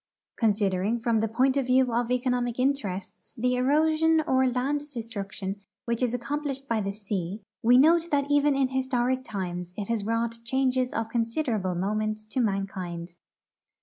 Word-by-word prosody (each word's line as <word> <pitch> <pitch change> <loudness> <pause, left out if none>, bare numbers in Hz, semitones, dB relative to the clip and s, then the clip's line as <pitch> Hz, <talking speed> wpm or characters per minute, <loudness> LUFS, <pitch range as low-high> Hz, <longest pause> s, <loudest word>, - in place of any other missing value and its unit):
Considering 205 0 +1
from 230 -1 +1
the 225 - +1
point 255 +5 +2
of 270 -2 0
view 255 -1 +3
of 240 0 0
economic 250 -1 0
interests 255 -9 -2
the 250 +2 +1
erosion 315 +5 +3
or 260 0 +3
land 260 +4 0
destruction 205 -4 -5 0.2
which 235 0 -1
is 250 -2 +2
accomplished 275 +2 -3
by 225 -2 0
the 195 0 -2
sea, 200 -2 -4 0.2
we 245 +2 +6
note 330 +5 +5
that 280 -1 +2
even 290 0 +3
in 270 -1 +2
historic 260 -1 0
times 180 -4 -5
it 205 0 -4
has 230 -3 0
wrought 230 +1 -1
changes 255 0 +1
of 225 -1 -2
considerable 230 - -1
moment 215 +3 -2
to 260 - -1
mankind. 185 -5 -3
235 Hz, 155 wpm, -27 LUFS, 205-260 Hz, 0.2 s, we